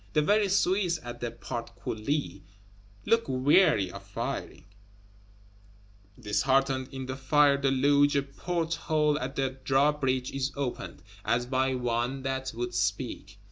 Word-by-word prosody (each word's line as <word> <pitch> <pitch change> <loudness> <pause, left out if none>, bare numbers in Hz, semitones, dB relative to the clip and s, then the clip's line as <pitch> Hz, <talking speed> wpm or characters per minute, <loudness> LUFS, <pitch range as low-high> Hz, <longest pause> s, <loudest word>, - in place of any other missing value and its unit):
The 150 - +3
very 205 +4 +3
Swiss 185 -3 +2
at 120 0 -7
the 120 - -3
Portcullis 115 +1 -4 0.7
look 230 +2 +3
weary 130 - +3
of 100 - -9
firing; 85 -7 -5 1.5
disheartened 130 +4 +1
in 130 -1 -6
the 130 0 -4
fire 140 +1 +4
deluge; 140 +2 +3
a 140 - +2
port 165 +4 -3
hole 150 -2 +1
at 130 +2 -5
the 135 -1 -2
drawbridge 135 -2 +1
is 135 0 -2
opened, 140 -3 -5 0.2
as 120 +1 +1
by 130 +1 0
one 125 +2 -1
that 130 0 -2
would 120 +1 -3
speak. 100 +2 -2
135 Hz, 130 wpm, -28 LUFS, 120-145 Hz, 1.5 s, fire